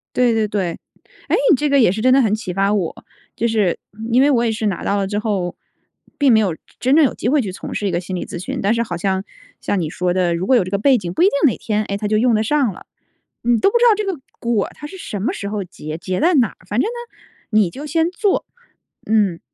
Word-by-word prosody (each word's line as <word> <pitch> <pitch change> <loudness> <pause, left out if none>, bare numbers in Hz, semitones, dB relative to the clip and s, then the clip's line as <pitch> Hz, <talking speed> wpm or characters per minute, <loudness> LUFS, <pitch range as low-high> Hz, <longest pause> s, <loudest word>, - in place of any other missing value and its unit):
对 245 -2 +3
对 220 -1 +1
对。 190 -5 -2 0.5
诶， - - +3 0.2
你 - - +7
这 295 - 0
个 280 0 +4
也 225 -8 +5
是 210 +3 -3
真 255 +2 +4
的 270 - +5
很 215 -4 +2
启 215 -5 -5
发 195 +2 +1
我， 190 -6 -3 0.3
就 235 - 0
是 215 -6 +1 0.3
因 250 +3 +5
为 285 +2 +4
我 240 -3 +2
也 230 - +1
是 220 0 -2
拿 190 -4 -2
到 200 - 0
了 195 -1 -1
之 205 +1 -2
后， 195 -5 -2 0.6
并 280 -3 +4
没 220 - +6
有 195 -6 +1
真 - - -26 0.2
真 260 +3 +3
正 315 -1 +6
有 - - 0
机 - - -4
会 290 +1 +3
去 200 -6 -4
从 185 - -7
事 205 - -2
一 - - 0
个 175 - 0
心 185 +1 -5
理 180 - -4
咨 - - -7
询， 185 - -4
但 200 +3 +2
是 235 - 0
好 180 -6 -5
像， 190 +1 -1 0.4
像 200 - -1
你 160 - -2
说 180 +2 -1
的， 180 -2 +1
如 175 +3 -3
果 260 - +5
有 235 - +4
这 185 - -7
个 200 - +1
背 260 +5 +4
景， 175 -5 -5
不 - - -1
一 - - +7
定 395 - +3 0.2
哪 - - -4
天， 215 -1 -1
哎， 200 - -3
它 210 0 -3
就 215 +1 +2
用 240 +2 +3
得 215 0 +2
上 270 -1 +1
了， - - -13 0.6
你 240 0 +2
都 395 - +3
不 475 - +2
知 480 - +3
道 - - +5
这 425 - -2
个 380 -7 -3 0.2
果 235 -4 0
它 295 - -9
是 340 - -10
什 205 - -5
么 215 - 0
时 200 - -5
候 205 -1 -3
结， 155 -3 -8
结 185 +2 -3
在 345 +3 +3
哪 250 -7 +4
儿？ - - -17
反 210 +5 0
正 - - +1
呢， 475 +1 -7 0.3
你 215 -5 +3
就 280 - -8
先 325 +3 +1
做。 390 +2 0 0.6
嗯， 205 -6 +1
215 Hz, 305 characters per minute, -19 LUFS, 190-260 Hz, 0.6 s, 你